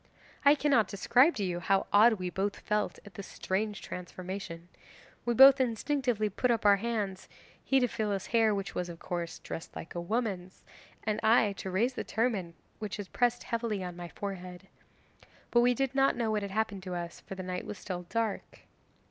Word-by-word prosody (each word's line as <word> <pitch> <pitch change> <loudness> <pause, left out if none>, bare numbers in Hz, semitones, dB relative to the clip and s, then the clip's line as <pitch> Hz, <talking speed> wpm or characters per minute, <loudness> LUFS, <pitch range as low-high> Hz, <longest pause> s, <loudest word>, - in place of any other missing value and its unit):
'I 285 +1 +8
cannot 275 -8 +3
describe 250 - +4
to 205 - -2
you 175 -2 -2
how 195 +3 +2
odd 220 +3 +7
we 185 -4 -4
both 200 +2 -2
felt 210 0 -1
at 205 - -12
this 195 +1 -8
strange 205 +2 -3
transformation. 180 -1 -7 0.6
We 240 0 +1
both 270 +2 +9
instinctively 245 -2 0
put 230 +5 -1
up 230 -3 +1
our 200 -1 +7
hands 205 -3 -3 0.3
he 270 - +3
to 250 - +2
feel 215 -2 -2
his 195 -2 -2
hair, 225 -3 +3
which 195 0 -4
was, 180 -1 -3
of 170 - -8
course, 170 0 -4
dressed 165 - -8
like - - -8
a 175 - -3
woman's, 190 -2 -3 0.4
and 215 -1 -1
I 220 -2 +4
to 190 - -5
raise 225 +8 +1
the - - -4
turban 210 -7 -1 0.2
which 210 -1 -5
pressed 245 0 +1
heavily 225 -4 -2
on 180 -1 -6
my 175 0 -7
forehead. 185 -1 -7 0.8
But 240 - +5
we 245 0 +4
did 270 +1 -1
not 270 0 +3
know 230 -2 0
what 210 -1 0
had 200 - -4
happened 205 -1 -1
to 185 -1 -5
us, 170 -1 -5
for 195 - -9
the 190 - -6
night 180 0 -4
was 210 - -6
still 180 -2 -6
dark. 225 -3 -3
205 Hz, 195 wpm, -30 LUFS, 185-235 Hz, 0.8 s, both